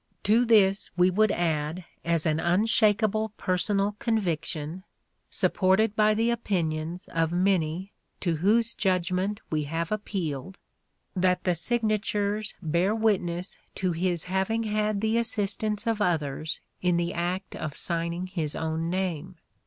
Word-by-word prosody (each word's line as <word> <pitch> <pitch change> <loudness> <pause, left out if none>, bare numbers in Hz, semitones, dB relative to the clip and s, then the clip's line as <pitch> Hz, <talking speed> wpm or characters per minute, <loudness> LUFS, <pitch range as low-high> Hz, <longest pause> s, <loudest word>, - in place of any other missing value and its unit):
To 225 +4 +4
this 200 -4 +4
we 180 +1 +5
would 215 +2 +3
add 160 0 -1 0.2
as 165 -2 0
an 155 -1 +1
unshakable 215 +3 +2
personal 200 +2 0
conviction, 170 -6 -1 0.5
supported 200 +3 +2
by 215 0 +4
the 230 +2 +2
opinions 170 -6 -2
of 165 -1 +1
many 180 0 +1 0.3
to 170 -4 0
whose 225 +7 +2
judgement 185 +1 0
we 155 -2 0
have 165 +4 -3
appealed, 190 -5 -3 0.6
that 180 0 +2
the 180 - +2
signatures 215 +1 0
bear 170 +6 +1
witness 185 -5 0 0.2
to 185 -2 0
his 175 0 0
having 190 +5 0
had 215 -1 0
the 220 +1 +2
assistance 215 -1 0
of 225 -2 0
others 155 -4 -1 0.2
in 180 -1 +2
the 170 0 -1
act 180 +3 -3
of 155 -2 -5
signing 170 +1 -2
his 165 -5 -2
own 160 +1 -2
name. 185 -1 -2
185 Hz, 130 wpm, -27 LUFS, 170-210 Hz, 0.6 s, we